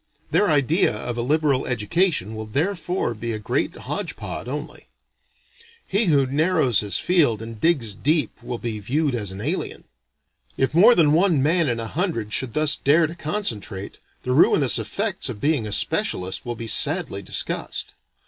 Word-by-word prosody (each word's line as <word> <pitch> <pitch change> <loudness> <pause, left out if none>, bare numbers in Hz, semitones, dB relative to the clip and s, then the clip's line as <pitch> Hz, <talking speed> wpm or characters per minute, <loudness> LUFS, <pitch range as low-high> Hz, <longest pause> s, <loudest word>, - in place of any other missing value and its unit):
Their 205 - +3
idea 150 - +2
of 120 +2 -4
a 120 - -2
liberal 140 0 +1
education 125 - 0
will 110 0 -6
therefore 175 - -1
be 115 +1 -4
a - - -2
great 105 - -1
hodge - - -4
pod - - -6
only. - - -6 1.0
He 200 +4 +1
who 145 -6 +3
narrows 145 - +2
his 100 -3 0
field 155 - +2
and 115 -1 -9
digs 140 -11 +2
deep 150 - -1
will 120 - -5
be 115 -2 -4
viewed 140 +7 0
as 105 -5 -2
an 95 +1 -7
alien. - - -3 0.7
If 135 0 0
more 215 +9 +7
than 150 -3 +4
one 165 -4 +3
man 165 0 +2
in 115 -1 -1
a 115 - -3
hundred 115 - -2
should 125 -4 -2
thus 155 -1 +3
dare 155 +4 +4
to 160 - -5
concentrate, 115 - -4 0.2
the 125 - -2
ruinous 135 -2 +4
effects 190 - -2
of 110 -5 -6
being 145 -5 0
a - - -5
specialist 95 +2 -1
will 120 - -3
be 115 - -7
sadly 145 - 0
discussed. 95 - -4
135 Hz, 170 wpm, -23 LUFS, 110-165 Hz, 1.0 s, more